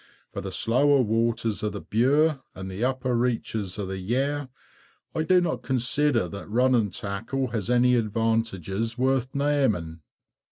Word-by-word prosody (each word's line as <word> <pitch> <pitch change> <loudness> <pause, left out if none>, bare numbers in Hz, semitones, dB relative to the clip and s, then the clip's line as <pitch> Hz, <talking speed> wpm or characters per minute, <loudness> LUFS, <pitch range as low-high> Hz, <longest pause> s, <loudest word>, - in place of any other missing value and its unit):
For - - -4
the - - -6
slower 140 +3 +3
waters 115 -1 0
of 105 -1 -2
the 100 - -5
Bure 140 +8 +2
and 95 0 -6
the 95 +5 -4
upper 130 -1 0
reaches 115 -5 -1
of 100 -2 -3
the 95 0 -4
Yare, 135 +7 -1 0.6
I - - -1
do 180 +3 +4
not 175 -2 -1
consider 130 +1 +2
that 100 +1 -8
running 120 -1 +2
tackle 105 +8 -3
has 110 -2 -3
any 125 0 +4
advantages 115 -2 -1
worth 130 0 0
naming. 130 - 0
120 Hz, 150 wpm, -26 LUFS, 105-130 Hz, 0.6 s, do